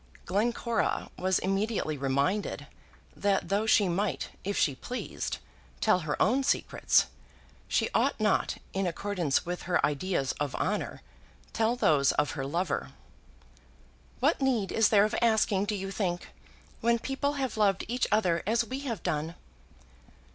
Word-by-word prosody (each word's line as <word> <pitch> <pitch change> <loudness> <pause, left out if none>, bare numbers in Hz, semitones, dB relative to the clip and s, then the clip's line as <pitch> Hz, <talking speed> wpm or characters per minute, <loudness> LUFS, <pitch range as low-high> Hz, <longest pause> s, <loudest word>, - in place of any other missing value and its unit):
Glencora 230 +4 0
was 185 0 +1
immediately 195 -4 -1
reminded 140 +9 -1 0.5
that 200 -1 0
though 205 +3 +1
she 205 -2 +5
might, 180 -4 -1
if 200 +1 -2
she 145 - +3
pleased, 250 - -4 0.4
tell 215 -4 +3
her 155 -4 -3
own 255 +5 +3
secrets, 275 - +2 0.6
she - - +1
ought - - +2
not, - - +1 0.2
in 195 -1 0
accordance 175 -5 -1
with 175 +1 -4
her 175 - +3
ideas 150 -2 -1
of 145 -2 -2
honour, - - -2 0.5
tell 225 +2 +2
those 145 - +3
of 145 0 +1
her 135 -3 -4
lover. 170 0 -2 1.3
"What - - +2
need 245 -7 +1
is 225 -1 +4
there 205 -1 +5
of 215 - -2
asking, 220 -4 +3
do 210 - -1
you 195 0 -4
think, 180 -3 -2 0.5
when 235 0 +3
people 270 +4 -2
have 270 -3 -2
loved 200 -3 +2
each 245 +3 0
other 180 -6 +2
as 230 +2 +2
we 260 +4 -4
have 235 -10 -4
done?" 155 +3 -2
195 Hz, 145 wpm, -29 LUFS, 170-225 Hz, 1.3 s, she